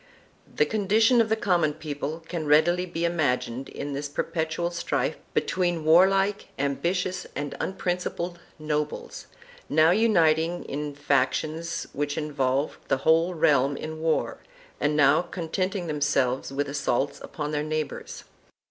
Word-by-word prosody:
I] - - -29
VIRTUAL - - -28
ANARCHY - - -28
7 - - -21
The 455 - +2 0.2
condition 225 +4 +5
of 225 - 0
the 220 - +3
common 175 -8 +1
people 155 +1 -5
can 165 -3 -4
readily 175 +5 +4
be 170 -1 -2
imagined 135 -6 -1
in 145 0 -5
this 140 +1 -4
perpetual 165 +3 -2
strife 170 - -1 0.2
between 175 -4 0
warlike, 195 +5 +4
ambitious 175 +7 -1
and 145 0 -3
unprin 180 -1 -1
cipled 175 0 -4 0.2
nobles, 150 -1 -3 0.4
now 155 +2 +5
uniting 175 -5 +3
in 145 +1 -4
factions 155 +4 0
which 145 0 -2
involved 140 -2 -1
the - - +2
whole 165 +3 +4
realm 140 -3 +3
in 155 0 -6
war, 160 -1 0 0.4
and 150 0 +1
now 145 +1 +5
contenting 180 +2 -3
themselves 145 -5 0
with 140 +1 -1
assaults 140 -1 -1
upon 150 -1 -5
their 150 -1 0
neighbors. 155 -1 -4
155 Hz, 145 wpm, -26 LUFS, 145-175 Hz, 0.4 s, condition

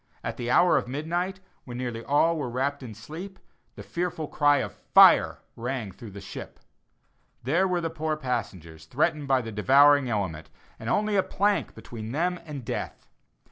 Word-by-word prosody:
At - - -3
the 120 0 -4
hour 175 +7 +5
of - - -1
midnight, 175 +8 -3 0.2
when 120 -1 -8
nearly 120 -2 -4
all 155 +5 +3
were 145 -6 -3
wrapt 140 +4 -2
in 115 -5 -8
sleep, 170 - -9 0.4
the - - -9
fearful 170 -3 -3
cry 145 -1 +3
of - - -3
"fire" - - +5
rang 120 -3 -4
through 110 +4 -11
the 100 0 -9
ship. - - -9 0.8
There 170 +10 +2
were 180 -1 0
the 165 -1 -2
poor 155 -1 -2
passengers, 95 - -5
threatened 150 - 0
by 135 -1 +3
the 115 - -6
devouring 135 +5 +5
element, 95 -8 -3 0.3
and 110 - -5
only 210 - +1
a - - +5
plank 205 +2 0
between 115 0 -8
them 175 +4 0
and 140 -5 -7
death. - - -5
140 Hz, 175 wpm, -26 LUFS, 115-165 Hz, 0.8 s, hour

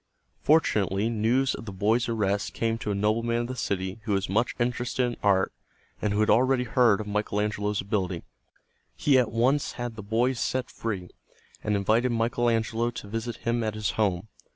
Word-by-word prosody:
Fortunately 105 - +2
news 120 +4 +2
of - - -7
the 105 - -6
boys' 110 +6 +1
arrest 100 -3 -1
came 115 0 0
to 105 - -4
a 100 - 0
nobleman 115 +3 +1
of 120 - -3
the 130 - -5
city 95 -3 -2
who 105 - 0
was 95 0 0
much 110 +5 +1
interested 125 +1 0
in 120 -1 -2
art 95 -2 +2 0.5
and 105 - 0
who 105 +1 +1
had 110 - +2
already 130 +1 +3
heard 120 -3 +3
of 110 - -4
Michael 105 0 -1
Angelo's 105 -1 -1
ability. 95 -3 -2 0.7
He 140 -3 +4
at 120 - +1
once 130 +6 +1
had 120 -2 -5
the 110 - -7
boys 115 +4 0
set 130 0 -1
free, 95 -6 -4 0.5
and 105 - +1
invited 110 +5 +2
Michael 120 +1 +1
Angelo 115 +1 0
to 120 -3 -8
visit 115 +2 -4
him 115 0 +1
at 110 -1 -2
his 110 -1 -1
home. 100 -2 0
110 Hz, 190 wpm, -27 LUFS, 105-120 Hz, 0.7 s, He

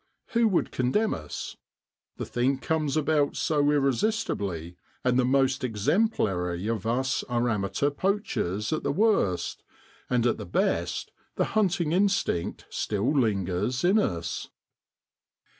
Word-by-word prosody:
Who 235 -1 +3
would 190 -5 +1
condemn 130 - +1
us? 75 -2 -6 0.6
The - - -4
thing 130 +3 0
comes 155 +1 -1
about 150 -1 +2
so 145 -2 +2
irresistibly, 135 - 0 0.3
and 125 0 +3
the - - +4
most 130 0 +2
exemplary 105 - 0
of 110 -2 -2
us 130 +3 0
are 120 0 0
amateur 105 +6 0
poachers 145 - -1
at 155 - -1
the 140 - -1
worst, 195 - +1 0.5
and 120 -2 +2
at 120 - +1
the - - -5
best - - -1 0.2
the - - +1
hunting 190 -6 +1
instinct 195 - 0
still 110 +7 0
lingers 105 0 0
in 190 +5 +4
us. 85 - -2
130 Hz, 125 wpm, -27 LUFS, 105-160 Hz, 0.6 s, the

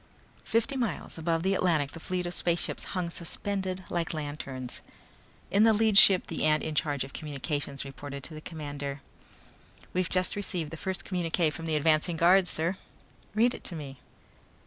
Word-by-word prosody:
Fifty 230 +5 +1
miles 235 -8 -3
above 165 0 0
the 190 +1 +2
Atlantic 160 -7 +2
the 165 - -9
fleet 180 +2 -2
of 175 - -3
spaceships 170 -1 -1
hung 175 -2 -1
suspended 185 +2 -3
like 170 -1 -1
lanterns. 145 -4 -5 0.7
In 200 +2 +5
the 225 0 +6
lead 215 -1 +3
ship 195 -2 +9
the 165 - -4
ant 155 0 +3
in 160 - -3
charge 145 -3 0
of 135 - -10
communications 145 -1 -3
reported 140 0 -7
to 160 - -6
the 155 - -8
commander. 145 -3 -5 0.9
"We've 180 -2 +1
just 185 0 +1
received 180 -6 -2
the - - -5
first 190 +3 -3
communique 170 -3 +1
from 165 +2 -6
the 160 - +1
advance 155 +2 +3
guard, 180 +3 +5
sir." 170 +4 -1 0.6
"Read 240 +3 +4
it - - -9
to 175 - -4
me." 140 -4 -7
165 Hz, 170 wpm, -29 LUFS, 150-185 Hz, 0.9 s, ship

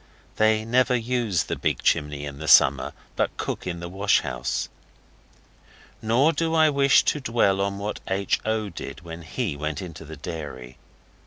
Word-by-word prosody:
They 110 0 +3
never 125 +2 +3
use 115 -7 0
the - - -3
big - - -2
chimney 75 -2 0
in 70 -1 -8
the 80 - -6
summer, 70 -2 +5 0.2
but - - -1
cook - - -4
in 85 -1 -4
the 85 - -5
wash 100 +3 +2
house. - - -3 1.3
Nor 125 +9 +3
do 165 0 0
I 155 -1 +5
wish 140 -1 +4
to 150 - 0
dwell 115 -6 +1
on 100 0 -1
what 105 +1 -4
H. 100 +1 0
O. 110 -1 -1
did 85 - -8
when 85 -1 -9
he 80 -2 -3
went 75 0 -3
into 80 -4 -8
the 80 0 -10
dairy. 70 -6 -7
100 Hz, 170 wpm, -24 LUFS, 80-115 Hz, 1.3 s, summer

